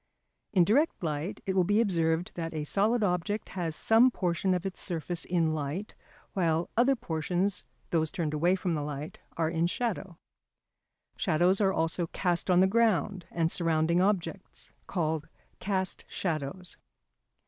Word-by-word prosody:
In 185 -4 +5
direct 255 - +2
light 155 +3 -3
it 190 - -1
will 185 - +4
be 205 +4 +2
observed 170 -5 +1
that 165 -2 -4
a 155 - -2
solid 210 +8 +2
object 200 +3 -1
has 170 -4 -3
some 225 +8 +5
portion 185 -3 0
of 180 +1 -3
its 190 - -4
surface 170 -1 -3
in 165 -3 +1
light, 155 +7 -4 0.4
while 165 -3 0
other 250 +4 +4
portions, 180 0 -1 0.3
those 160 -2 +2
turned 155 -3 -2
away 170 +5 +3
from 180 -2 -1
the 150 - -1
light, 145 +1 -6 0.2
are 165 -1 +1
in 165 0 +1
shadow. 195 -4 -3 1.0
Shadows 180 +2 +2
are 195 -1 +4
also 165 0 0
cast 175 +1 -1
on 180 0 +5
the - - +6
ground 200 -3 +1
and 165 -1 0
surrounding 165 0 +2
objects, 195 -1 -2 0.2
called 160 -4 -1 0.3
cast 190 -1 -2
shadows. 175 +1 -4
175 Hz, 150 wpm, -29 LUFS, 160-195 Hz, 1.0 s, the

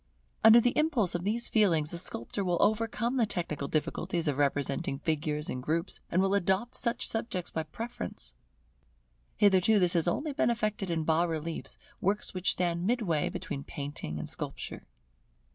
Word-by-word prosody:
Under 225 +1 +9
the 245 +1 +1
impulse 280 - +2
of 175 - -2
these 225 +4 -1
feelings, 165 -9 +3
the 170 - -1
sculptor 170 - -1
will 175 -2 +1
overcome 230 +4 +1
the 230 -3 +3
technical 155 -7 -3
difficulties 165 +2 -1
of 145 -1 0
representing 140 -1 0
figures 150 0 -2
in 125 - -4
groups, 165 +6 -1
and 185 +2 +2
will 195 0 +1
adopt 200 +5 +1
such 235 -1 +1
subjects 225 -6 -2
by 160 - -1
preference. 155 - -7 1.0
Hitherto 205 +1 +5
this 180 -3 +4
has 170 -1 +2
only 290 - -1
been 240 - +2
effected 215 -4 -1
in 165 -2 0
bas 165 +2 +2
reliefs, 160 0 -4 0.2
works 205 +3 0
which 185 0 +1
stand 175 0 0
midway 210 -11 +1
between 140 -1 -5
painting 140 - -6
and 75 - -5
sculpture. - - -4
175 Hz, 160 wpm, -30 LUFS, 155-215 Hz, 1.0 s, Under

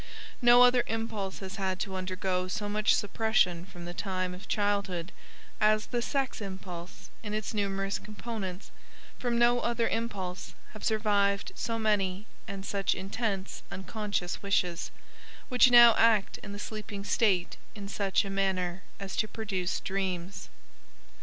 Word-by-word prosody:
No 240 0 +8
other 250 0 +5
impulse 220 -4 -3
has 190 -1 -6
had 190 -1 -1
to 195 -2 -3
undergo 185 0 -1
so 205 +3 -3
much 210 +1 +3
suppression 200 -5 +1
from 175 -2 -10
the 175 - -6
time 185 -1 -2
of 180 +2 -10
childhood 200 -4 0 0.5
as 215 0 +3
the 240 -1 -2
sex 265 -1 -1
impulse 190 -3 -8
in 210 -1 -4
its 215 +1 -3
numerous 195 -1 -1
components, 210 -3 -6 0.5
from 240 -1 0
no 240 +1 +5
other 235 -1 0
impulse 195 -6 -3 0.2
have 215 - -10
survived 205 -2 +2
so 230 -1 -2
many 205 -3 0 0.2
and 195 -2 -6
such 200 -1 0
intense 195 0 -3
unconscious 200 -2 -3
wishes, 180 -4 0 0.6
which 250 0 +6
now 240 -1 +9
act 220 -3 +4
in 205 - -9
the 205 - -6
sleeping 210 -1 -6
state 195 -5 +1 0.2
in 200 -2 -7
such 200 +1 +1
a - - -4
manner 190 -2 0 0.2
as 195 -1 -5
to 215 - +2
produce 195 -5 -2
dreams. 190 -1 -3
200 Hz, 145 wpm, -30 LUFS, 190-220 Hz, 0.6 s, now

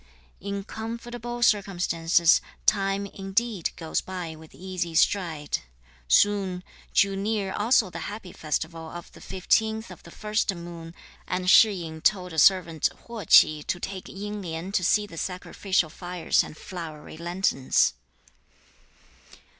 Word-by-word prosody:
In 200 +1 -4
comfortable 240 +2 -5
circumstances, 175 -6 +3 0.2
time 195 -1 +2
indeed 195 0 -1
goes 160 -2 -2
by 180 -4 -6
with 160 0 -15
easy 180 -3 -4
stride. 160 -5 +1 0.5
Soon 190 - +3 0.3
drew 195 0 +3
near 200 -1 -1
also 215 -2 +3
the - - -6
happy 205 -3 -8
festival 160 +1 -3
of 175 0 -9
the - - -15
15th 220 +4 0
of - - -11
the - - -14
1st 210 -3 -1
moon, 170 -1 -9 0.3
and 180 0 -2
Shih 215 +3 +7
yin 160 -4 -6
told 180 -2 +1
a 160 - 0
servant 170 -3 +4 0.2
Huo 230 -3 -7
Ch'i 155 -1 +7
to 175 - -1
take 190 +1 -6
Ying 205 +1 -6
Lien 170 +1 -5
to 195 -2 +1
see 210 +4 +3
the 165 -5 -8
sacrificial 185 -2 -1
fires 175 0 0
and 155 - -10
flowery 160 -5 -8
lanterns. 170 -5 +1
185 Hz, 135 wpm, -26 LUFS, 170-205 Hz, 0.5 s, Shih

